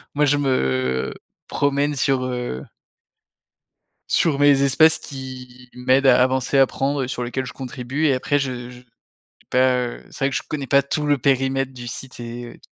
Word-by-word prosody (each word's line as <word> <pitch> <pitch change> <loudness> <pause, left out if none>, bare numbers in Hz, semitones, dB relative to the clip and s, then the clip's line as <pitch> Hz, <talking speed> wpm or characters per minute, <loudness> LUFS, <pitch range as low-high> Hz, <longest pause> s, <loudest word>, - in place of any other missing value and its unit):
Moi 150 +1 +3
je 145 +1 +3
me 65 - 0 0.3
promène 140 +1 0
sur 135 -1 +1
heu 125 - -4 1.5
sur 150 -4 +2
mes 145 -1 +5
espaces 155 +4 +4
qui 125 -3 -9
m'aident 130 +2 +2
à 125 -1 +6
avancer, 130 +1 +2
à - - +8
apprendre 135 +1 +1
et - - -3
sur 125 -2 -4
lesquels 130 +2 -3
je - - -8
contribue 130 +3 -4
et 140 - +4
après 140 +3 0
je 125 -3 -3
je 125 0 -13 0.7
pas, 130 0 +3
heu, 120 - -8
c'est 135 - -4
vrai 140 - +2
que - - -2
je - - -2
connais 145 -3 -4
pas 140 +1 +4
tout 150 +2 -2
le 145 -1 +3
périmètre 135 0 +1
du 120 -1 -9
site 130 +2 -8
et. 120 0 -8
130 Hz, 180 wpm, -22 LUFS, 125-140 Hz, 1.5 s, à